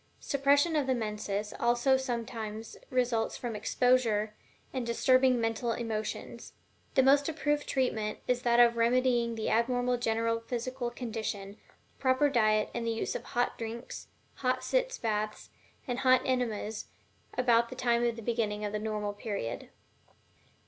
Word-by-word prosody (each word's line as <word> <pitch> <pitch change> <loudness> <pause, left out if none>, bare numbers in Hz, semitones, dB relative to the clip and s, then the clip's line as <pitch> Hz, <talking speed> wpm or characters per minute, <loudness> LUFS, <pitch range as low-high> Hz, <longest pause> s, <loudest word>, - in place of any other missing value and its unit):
Suppression 285 +3 +2
of 290 -3 +1
the 260 - +2
menses 210 -2 -3
also 240 +3 +3
sometimes 230 -4 -4
results 245 -3 0
from 235 -3 -4
exposure 220 -2 +2 0.4
and 260 -2 -2
disturbing 255 +2 +3
mental 225 +1 0
emotions. 220 -2 -4 0.4
The 265 - +5
most 280 +3 +4
approved 295 -1 -1
treatment 220 -5 0
is 250 -1 +1
that 240 -1 +3
of 235 -1 +6
remedying 240 0 +2
the 220 - -2
abnormal 245 +2 +2
general 230 -1 0
physical 245 +1 -3
condition, 220 -4 -5 0.4
proper 265 +2 +3
diet, 215 -4 +2
and 230 -1 -3
the - - +2
use 225 0 -2
of - - -5
hot 245 0 -1
drinks, 230 +1 -6 0.3
hot 255 -1 0
sitz - - 0
baths, 215 -1 -3 0.4
and 245 0 -2
hot 255 -1 +4
enemas 225 -4 -2 0.5
about 235 -2 +3
the 255 - -7
time 240 -2 +1
of 235 -1 +1
the 230 - -8
beginning 210 -2 -1
of 205 - -3
the 210 - -2
normal 210 -1 -2
period. 200 - -5
235 Hz, 145 wpm, -30 LUFS, 220-255 Hz, 0.5 s, of